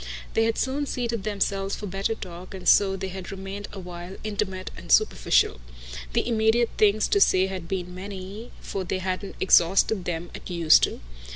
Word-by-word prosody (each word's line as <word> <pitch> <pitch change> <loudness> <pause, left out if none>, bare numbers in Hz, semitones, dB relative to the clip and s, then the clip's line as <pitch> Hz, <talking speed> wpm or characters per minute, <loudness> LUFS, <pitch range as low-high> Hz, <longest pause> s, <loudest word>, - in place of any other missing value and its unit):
They 225 - +3
had 225 0 0
soon 280 +2 -1
seated 235 -4 -2
themselves 195 -1 -1
for 210 - -7
better 195 +3 -2
talk, 180 -1 -9
and 185 - -7
so 195 -1 +5
they 190 0 -4
had 190 -1 -7
remained 195 +1 -6
a 200 - -8
while, 175 0 -8
intimate 200 -3 -3
and - - -8
superficial. - - +3 0.5
The - - +1
immediate 225 0 +2
things 215 0 +4
to 405 - +3
say 185 - +5
had 190 -3 -5
been 180 -1 -4
many, 195 +4 -8
for 195 - -4
they 185 - -2
hadn't 185 +1 -4
exhausted 190 +2 +4
them 170 0 -4
at - - -9
Euston. 170 -3 +4
195 Hz, 175 wpm, -25 LUFS, 185-215 Hz, 0.5 s, so